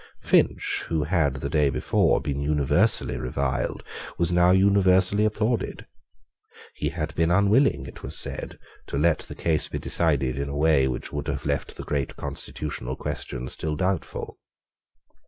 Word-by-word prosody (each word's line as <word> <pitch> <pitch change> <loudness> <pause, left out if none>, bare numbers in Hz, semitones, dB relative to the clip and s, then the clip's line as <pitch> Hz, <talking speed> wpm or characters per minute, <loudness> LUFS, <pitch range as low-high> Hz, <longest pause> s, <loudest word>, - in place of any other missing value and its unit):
Finch, - - +2
who 80 -2 0
had 75 -4 +1
the 70 0 -4
day 75 -2 +2
before 65 - +2
been 70 0 -3
universally 70 -3 +2
reviled, 65 +1 -2 0.3
was 85 0 +2
now 90 0 +4
universally 95 +1 +4
applauded. 110 +2 -1 0.9
He - - -2
had - - -4
been 80 0 +1
unwilling, 100 - +3
it 65 - -11
was - - -3
said, - - -3 0.3
to - - -3
let 80 +2 +3
the - - -8
case 80 -2 0
be - - -5
decided 70 -6 0
in 70 0 -3
a 70 - -4
way 75 -3 +3
which 65 - -5
would 75 0 -4
have 70 -1 -3
left 70 -1 -2
the - - -6
great 70 -3 -2
constitutional 70 -2 -5
question 65 -1 -5
still 75 +3 -3
doubtful. 90 +2 -3
75 Hz, 155 wpm, -25 LUFS, 70-90 Hz, 0.9 s, now